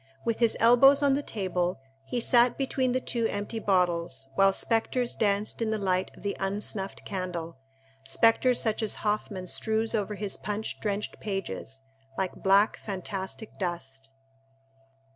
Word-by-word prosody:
With 230 Hz, -1 st, 0 dB
his 230 Hz, -2 st, +3 dB
elbows 270 Hz, +5 st, +6 dB
on 280 Hz, -1 st, +4 dB
the 280 Hz, -, +1 dB
table 185 Hz, -, -2 dB, 0.3 s
he 245 Hz, -, -1 dB
sat 240 Hz, +1 st, +4 dB
between 265 Hz, -2 st, 0 dB
the 255 Hz, -, +1 dB
two 235 Hz, -2 st, 0 dB
empty 205 Hz, +2 st, -4 dB
bottles, 170 Hz, -9 st, 0 dB
while 195 Hz, +7 st, +5 dB
spectres 235 Hz, +4 st, 0 dB
danced 205 Hz, +1 st, 0 dB
in 225 Hz, -, +1 dB
the 220 Hz, -, 0 dB
light 185 Hz, -2 st, 0 dB
of -, -, -15 dB
the 200 Hz, -, -2 dB
unsnuffed 195 Hz, 0 st, -3 dB
candle—spectres 165 Hz, -, -1 dB
such 220 Hz, 0 st, 0 dB
as 220 Hz, -, -1 dB
Hoffmann 210 Hz, -3 st, -1 dB
strews 220 Hz, +4 st, -1 dB
over 210 Hz, -1 st, -1 dB
his 205 Hz, -1 st, -3 dB
punch 210 Hz, +1 st, -4 dB
drenched 205 Hz, -1 st, -3 dB
pages, 175 Hz, -, -5 dB, 0.4 s
like 190 Hz, -1 st, -1 dB
black, 200 Hz, +2 st, +3 dB
fantastic 195 Hz, +1 st, -6 dB
dust. 135 Hz, -8 st, -4 dB
205 Hz, 145 wpm, -28 LUFS, 180-225 Hz, 0.4 s, elbows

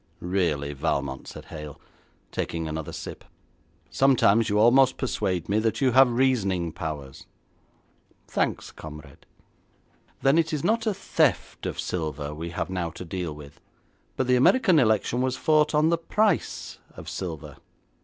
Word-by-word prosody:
'Really, 85 Hz, -6 st, -1 dB
Valmont,' 70 Hz, -2 st, -2 dB
said -, -, -9 dB
Hale, 75 Hz, -2 st, -9 dB, 0.5 s
taking 80 Hz, -1 st, -3 dB
another 80 Hz, 0 st, -4 dB
sip, -, -, -8 dB, 0.7 s
'sometimes 115 Hz, -5 st, +4 dB
you 105 Hz, -, +1 dB
almost 130 Hz, +4 st, +5 dB
persuade 95 Hz, -9 st, -2 dB
me 105 Hz, +2 st, +2 dB
that 110 Hz, 0 st, 0 dB
you 130 Hz, -2 st, +3 dB
have 130 Hz, 0 st, +6 dB
reasoning 105 Hz, -9 st, +1 dB
powers.' 75 Hz, -4 st, -7 dB, 1.0 s
'Thanks, -, -, -2 dB
comrade. 75 Hz, -1 st, -12 dB, 1.0 s
Then 135 Hz, +4 st, +5 dB
it 160 Hz, -1 st, 0 dB
is 150 Hz, -, -2 dB
not 225 Hz, +1 st, +1 dB
a 215 Hz, -, +2 dB
theft 155 Hz, -, 0 dB
of -, -, -5 dB
silver 75 Hz, -4 st, -3 dB
we 80 Hz, +3 st, -6 dB
have 85 Hz, +2 st, -4 dB
now 90 Hz, -2 st, -2 dB
to 85 Hz, +3 st, -9 dB
deal 85 Hz, -3 st, -4 dB
with. 75 Hz, -1 st, -13 dB, 0.6 s
But 130 Hz, -, +1 dB
the 125 Hz, 0 st, +3 dB
American 185 Hz, -, +5 dB
election 110 Hz, 0 st, +2 dB
was 130 Hz, 0 st, 0 dB
fought 155 Hz, +1 st, +3 dB
on 155 Hz, +2 st, +4 dB
the 170 Hz, 0 st, +1 dB
price 205 Hz, +2 st, 0 dB, 0.2 s
of -, -, -9 dB
silver. 80 Hz, -4 st, -6 dB
100 Hz, 145 wpm, -26 LUFS, 80-135 Hz, 1.0 s, have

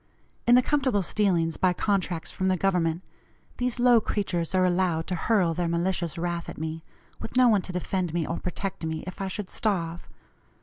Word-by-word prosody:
In 240 Hz, -, +7 dB
the 250 Hz, -, +5 dB
comfortable 260 Hz, -9 st, +1 dB
stealings 170 Hz, -5 st, +1 dB
by 185 Hz, -1 st, +3 dB
contracts 180 Hz, -4 st, -1 dB
from 190 Hz, -, -2 dB
the 185 Hz, -1 st, +2 dB
Government, 180 Hz, -2 st, +1 dB, 0.5 s
these 250 Hz, 0 st, -1 dB
low 240 Hz, -2 st, +6 dB
creatures 185 Hz, -5 st, -2 dB
are 185 Hz, 0 st, +4 dB
allowed 175 Hz, -3 st, +1 dB
to 185 Hz, -, -3 dB
hurl 180 Hz, -2 st, +2 dB
their 175 Hz, +1 st, -1 dB
malicious 170 Hz, 0 st, -1 dB
wrath 170 Hz, 0 st, -3 dB
at -, -, -8 dB
me, 160 Hz, +1 st, -4 dB, 0.4 s
with 230 Hz, -, -4 dB
no 255 Hz, -1 st, +7 dB
one 210 Hz, -4 st, +4 dB
to 185 Hz, -, -6 dB
defend 180 Hz, -1 st, -2 dB
me 170 Hz, -1 st, -1 dB
or 170 Hz, -, -3 dB
protect 185 Hz, 0 st, -4 dB
me, 160 Hz, 0 st, -3 dB
if 185 Hz, +2 st, -7 dB
I 195 Hz, -, -1 dB
should 190 Hz, 0 st, -5 dB
starve. 170 Hz, -6 st, -2 dB
180 Hz, 190 wpm, -26 LUFS, 170-200 Hz, 0.5 s, In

